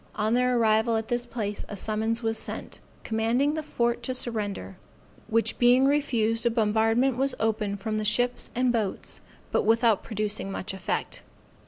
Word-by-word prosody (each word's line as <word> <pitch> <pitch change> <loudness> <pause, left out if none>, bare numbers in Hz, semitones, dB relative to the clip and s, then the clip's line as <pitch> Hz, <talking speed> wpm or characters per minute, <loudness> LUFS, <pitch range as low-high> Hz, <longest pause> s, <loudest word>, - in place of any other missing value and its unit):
On 215 +1 0
their 250 0 +2
arrival 220 0 +3
at 220 0 -4
this 240 0 -1
place, 210 -4 -3
a 205 - -6
summons 220 +3 -1
was 225 0 0
sent, - - -6 0.2
commanding 230 +6 +1
the 315 - -2
fort 240 -5 -1
to 255 +2 -2
surrender, 205 - -3 0.5
which 230 +1 0
being 250 +2 +5
refused, 235 -6 +1
a 235 - +4
bombardment 225 +3 +2
was 270 0 +1
opened 215 -2 -1
from 215 +1 -2
the - - -2
ships 245 +4 +1
and 250 0 +2
boats, 215 -5 -3 0.3
but - - +2
without 225 -1 +3
producing 210 -2 -3
much 195 0 -4
effect. 190 - -3
225 Hz, 165 wpm, -27 LUFS, 215-245 Hz, 0.5 s, being